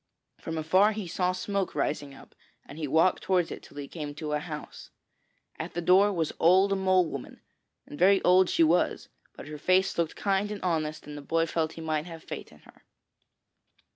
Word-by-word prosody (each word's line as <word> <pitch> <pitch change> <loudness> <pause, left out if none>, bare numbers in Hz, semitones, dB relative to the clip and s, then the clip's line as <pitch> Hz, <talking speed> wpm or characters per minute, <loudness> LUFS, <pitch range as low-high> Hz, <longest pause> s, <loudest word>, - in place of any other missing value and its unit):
From 165 0 -5
afar 185 +7 +3
he 210 -3 -5
saw 180 +1 0
smoke 185 +1 -3
rising 145 -2 -2
up, - - -16 0.3
and 145 - -11
he 155 - -2
walked 160 +6 +3
towards 180 -3 +1
it - - -7
till - - -16
he 145 -1 -6
came 150 -3 -7
to 150 0 -5
a 150 - 0
house. 150 -1 -8 0.7
At - - -6
the - - -1
door 190 +4 +5
was 165 -5 -2
Old 190 +4 +4
Mole 185 -1 +3
woman, 140 -5 -7 0.5
and 145 - -11
very 195 +2 +5
old 185 0 +5
she 165 - +3
was, 165 +3 +1 0.3
but - - -10
her 150 0 -8
face 185 +2 +2
looked 165 -2 -1
kind 200 0 0
and 210 - -6
honest 155 -3 -2
and 150 - -8
the 145 - -7
boy 165 +3 0
felt 160 -1 -2
he 165 - -9
might 155 0 -2
have 165 -2 -10
faith - - -8
in - - -19
her. - - -20
165 Hz, 200 wpm, -28 LUFS, 155-185 Hz, 0.7 s, door